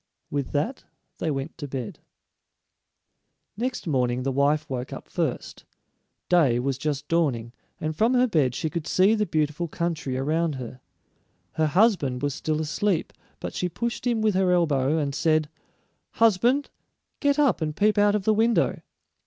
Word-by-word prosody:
With 140 -2 -2
that 220 - -1 0.4
they 165 - -1
went 140 +1 -4
to 145 - -5
bed. 130 -4 -5 1.6
Next 245 +4 -3
morning 125 -5 0
the 135 - 0
wife 145 +3 +1
woke 130 -2 -4
up - - -8
first; - - -3 0.6
day 155 -9 +4
was 135 +1 -1
just 145 -1 -2
dawning, 130 -9 0 0.3
and 155 0 -3
from 225 +9 +2
her 250 0 +5
bed 150 - +1
she - - -2
could 160 0 -4
see 190 +4 +4
the 215 -1 0
beautiful 155 +1 -1
country 155 -5 -3
around 155 +3 0
her. 125 0 -8 0.7
Her 160 -1 +1
husband 150 - +2
was 145 -1 0
still 155 +2 -2
asleep, 160 +3 -1 0.3
but - - -5
she 180 - -2
pushed 235 +7 -3
him 230 -3 +1
with 215 -1 +3
her 185 -1 +2
elbow, 155 -4 +2
and 145 -3 -1
said, 155 0 +1 0.6
"Husband, 230 +6 +3 0.5
get 285 -1 +2
up 280 - +3
and 155 -1 -2
peep 210 0 +3
out 205 0 +4
of 210 - -1
the 215 - +3
window. 225 +2 +2
155 Hz, 160 wpm, -25 LUFS, 140-205 Hz, 1.6 s, her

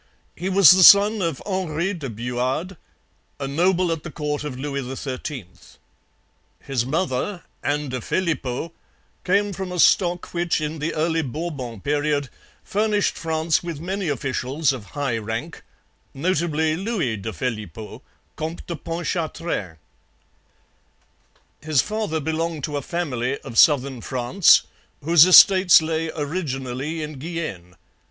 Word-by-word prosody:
He 180 +3 -3
was 195 -3 +7
the 185 +1 +5
son 205 +3 +7
of 165 -6 -2
Henri 185 -1 -2
de 150 -8 -6
Buade, 125 - -3 0.6
a 135 - -3
noble 175 +4 +1
at 165 -2 -2
the 170 - -8
court 150 -2 -3
of 145 -4 -5
Louis 140 +1 -3 0.2
XIII. 130 - -5 1.2
His 125 -3 -2
mother, 165 +4 -2 0.2
Anne 145 0 -1
de 130 -1 -4
Phelippeaux, 155 -2 -2 0.5
came 200 +2 +1
from 190 0 -5
a 180 - -4
stock 175 +1 +2
which 175 -1 0
in 155 +1 -4
the 155 +3 -3
early 160 +1 +1
Bourbon 135 - -5
period 145 -1 0 0.3
furnished 210 0 0
France 160 -1 0
with 170 -4 -6
many 190 +3 -3
officials 135 +1 -1
of 120 -6 -8
high 135 -5 -1
rank, 115 +9 -5 0.5
notably 160 0 0
Louis 185 - -2
de 110 +3 -5
Phelippeaux, 105 0 -6 0.3
Comte 160 +2 -5
de 170 - -5
Pontchartrain. 165 - -4 1.8
His 155 -3 +1
father 210 -7 -2
belonged 160 0 -3
to 150 - -3
a 145 - -1
family 140 -5 -2
of 115 - -9
southern 135 -4 +4
France 130 - +4 0.4
whose 165 +2 +6
estates 185 0 +8
lay 160 0 -2
originally 145 -1 -3
in 150 -2 -7
Guienne. 135 - -6
155 Hz, 130 wpm, -22 LUFS, 135-175 Hz, 1.8 s, estates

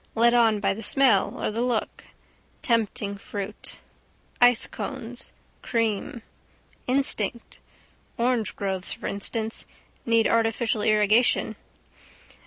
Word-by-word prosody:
Led 235 +1 +4
on 225 -3 +4
by 195 -1 +1
the 215 - -8
smell 240 -2 +3
or - - -1
the 225 +2 -2
look. 245 -3 -2 0.6
Tempting 220 -3 0
fruit. 200 -1 -6 0.6
Ice 245 -2 +5
cones. 245 -1 -6 0.3
Cream. 225 0 -2 0.6
Instinct. 250 -4 0 0.6
Orangegroves 215 -6 -1
for - - -10
instance. 220 +3 -2 0.4
Need 230 -1 +3
artificial 225 -1 +1
irrigation. 215 +3 +3
225 Hz, 95 wpm, -25 LUFS, 210-240 Hz, 0.6 s, Ice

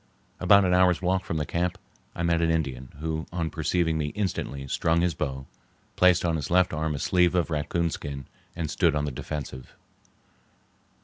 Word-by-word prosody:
About 100 +1 +6
an 90 - +2
hour's 90 -1 +4
walk 95 0 0
from 80 - -2
the 75 - -1
camp 85 +3 -1 0.4
I 85 - -3
met 85 -1 +2
an 85 - +2
Indian, 70 -6 -1
who 80 0 -3
on 85 -2 -2
perceiving 80 0 0
me 75 - -1
instantly 85 -9 -3
strung 80 +4 +1
his 90 -1 +1
bow, 65 -3 -4 0.5
placed 90 -1 +4
on 85 -1 +1
his 75 - -4
left 90 0 +3
arm 80 0 -1
a - - -3
sleeve 90 +4 +2
of 85 -2 +1
raccoon 80 +2 0
skin 70 -2 -6 0.3
and 80 -3 -3
stood 75 - +2
on 75 0 0
the 75 - -3
defensive. 65 -1 -6
80 Hz, 185 wpm, -26 LUFS, 75-90 Hz, 0.5 s, About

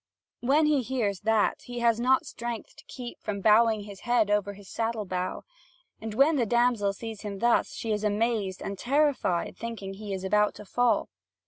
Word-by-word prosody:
When 285 +5 +3
he 300 -3 +3
hears 225 -6 -1
that, 220 0 +1
he 245 0 -7
has 230 -1 +3
not 255 +2 +3
strength 235 -1 -6
to - - -14
keep 245 -2 -8
from 200 -1 -3
bowing 220 +1 +4
his 200 -2 -10
head 240 -4 +2
over 205 -1 +1
his 200 -1 -14
saddle 225 -1 -2
bow. 185 -1 -3 0.6
And 220 -1 -5
when 285 +5 +4
the 240 - +2
damsel 235 -3 +2
sees 220 +1 -7
him 205 -2 -5
thus, 235 +3 +2
she 225 - -3
is 210 0 -1
amazed 210 -2 0
and 195 -1 -5
terrified, 275 - +1
thinking 225 -4 -6
he 205 +1 -7
is 190 -1 -3
about 210 +2 +2
to 210 - -10
fall. 245 +4 +1
220 Hz, 190 wpm, -28 LUFS, 205-240 Hz, 0.6 s, bowing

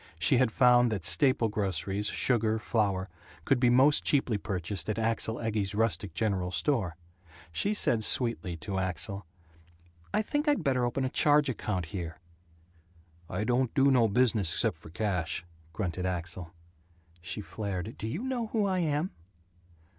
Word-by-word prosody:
She 120 +10 +4
had 125 -2 +2
found 125 0 +4
that 105 -3 -3
staple 130 -5 +4
groceries, 100 -1 -1
sugar, 110 -3 +1
flour, 100 -3 -1 0.4
could 135 -3 +2
be 120 -1 +4
most 135 +4 +4
cheaply 125 -7 +1
purchased 95 0 -3
at 105 - -1
Axel 115 0 0
Egge's 105 -3 -2
rustic 100 -5 0
general 95 -2 -1
store. 100 - -1 0.6
She 205 - 0
said 115 - +4
sweetly 110 -8 +1
to 95 +5 -4
Axel: 95 +1 -2 0.8
"I - - +1
think 295 +7 -2
I'd 290 - +2
better 130 -4 +1
open 130 +2 -1
a - - -1
charge 145 +1 +3
account 105 -7 -3
here." 85 -4 -5 1.1
"I 90 +4 -2
don't 125 +3 0
do 140 -1 +4
no 120 -3 +4
business 110 -5 +1
except - - 0
for 80 - -13
cash," 85 -3 -2 0.3
grunted 90 +1 -3
Axel. 90 -1 -3 0.7
She 90 - -6
flared, 100 0 -5
"Do 110 - -4
you 160 - -4
know 255 -3 -2
who 215 -1 0
I 190 -2 0
am?" 155 +2 -1
110 Hz, 155 wpm, -29 LUFS, 95-130 Hz, 1.1 s, She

